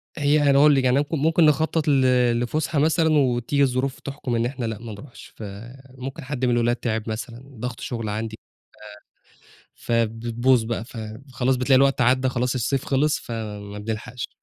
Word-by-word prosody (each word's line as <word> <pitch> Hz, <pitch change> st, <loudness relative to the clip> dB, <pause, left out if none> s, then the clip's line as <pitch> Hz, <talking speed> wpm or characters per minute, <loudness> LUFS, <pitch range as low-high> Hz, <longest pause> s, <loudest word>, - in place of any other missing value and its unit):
هي 145 Hz, 0 st, +3 dB
أنا 140 Hz, -, +5 dB
هاقول 145 Hz, 0 st, +6 dB
لِك 135 Hz, -, +2 dB
يعني 130 Hz, +1 st, +3 dB
اك 145 Hz, +3 st, -3 dB
ممكن 160 Hz, +2 st, +3 dB
نخطط 155 Hz, +1 st, +2 dB
ل -, -, +4 dB, 0.5 s
لفُسحة 150 Hz, +5 st, -1 dB
مثلًا 160 Hz, +1 st, +3 dB
وتيجي 130 Hz, +1 st, +2 dB
الظروف 130 Hz, 0 st, 0 dB
تحْكم 135 Hz, -3 st, -4 dB
إن 115 Hz, -, +1 dB
إحنا 125 Hz, -1 st, -3 dB
لأ 110 Hz, -1 st, -3 dB
ما 115 Hz, 0 st, -8 dB
نروحش، 120 Hz, +5 st, -12 dB
فممكن 130 Hz, +7 st, -9 dB
حد 130 Hz, -1 st, -2 dB
من 125 Hz, -, +2 dB
الولاد 120 Hz, 0 st, +2 dB
تِعب 110 Hz, -2 st, -3 dB
مثلًا، 115 Hz, +2 st, -6 dB, 0.2 s
ضغط 125 Hz, +2 st, -5 dB
شغل 115 Hz, -3 st, -4 dB
عندي، 110 Hz, +1 st, -4 dB, 1.1 s
آآ، -, -, -23 dB, 0.2 s
فبتبوظ 115 Hz, +2 st, +1 dB
بقى، 115 Hz, -1 st, -3 dB
فخلاص 125 Hz, +2 st, -3 dB
بتلاقي 130 Hz, +1 st, +3 dB
الوقت 135 Hz, 0 st, +3 dB
عدّى 130 Hz, +2 st, +3 dB
خلاص 125 Hz, 0 st, -1 dB
الصيف 135 Hz, +2 st, -1 dB
خلص، 145 Hz, +2 st, +1 dB
فما 105 Hz, -3 st, -6 dB
بنلحقش، 110 Hz, +3 st, -5 dB
125 Hz, 165 wpm, -23 LUFS, 115-140 Hz, 1.1 s, هاقول